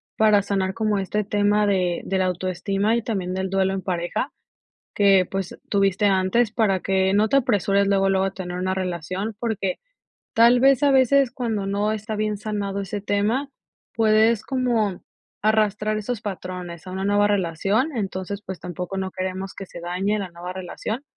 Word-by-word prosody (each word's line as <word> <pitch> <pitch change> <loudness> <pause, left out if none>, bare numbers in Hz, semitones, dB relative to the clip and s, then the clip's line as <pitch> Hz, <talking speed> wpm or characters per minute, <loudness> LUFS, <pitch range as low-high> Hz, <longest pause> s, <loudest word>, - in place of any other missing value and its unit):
Para 215 -2 +4
sanar 190 -1 -1
como 215 -1 0
este 200 +2 -1
tema 205 +1 +2
de 180 -3 +1
de 195 - -1
la 185 - +2
autoestima 185 +4 0
y 235 - -1
también 190 -5 -2
del 190 0 -2
duelo 190 0 +1
en 195 - -3
pareja. 180 - -2 0.6
Que, 195 -2 +5
pues, 195 -2 -4
tuviste 200 0 +2
antes 195 +4 +2
para 215 -4 +2
que 190 0 +1
no 210 +2 +3
te 275 - +4
apresures 200 -6 +2
luego, 195 -1 +3
luego 195 0 +1
tener 180 -1 -5
una 185 +1 -1
relación, 185 +3 -3
porque, 215 -5 -2 0.5
tal 235 +2 +6
vez, 270 0 +5
a 285 - +5
veces 265 0 +4
cuando 230 -6 -2
no 205 +2 0
está 215 0 -4
bien 210 0 -1
sanado 200 -1 -3
ese 200 +1 -4
tema, 210 +7 0 0.4
puedes 220 0 +3
como 235 -7 0 0.4
arrastrar 215 0 +2
esos 215 +1 -3
patrones 180 -3 -6
a - - -6
una 190 +1 -3
nueva 205 0 +3
relación. 200 - 0
Entonces, 195 -1 -4
pues, 190 -1 -6
tampoco 180 +2 -5
no 190 0 -3
queremos 190 +1 -4
que 195 - -7
se 175 - -10
dañe 185 +5 -1
la 195 -2 -4
nueva 175 +1 -7
relación. 190 +7 -5
200 Hz, 175 wpm, -23 LUFS, 190-215 Hz, 0.6 s, tal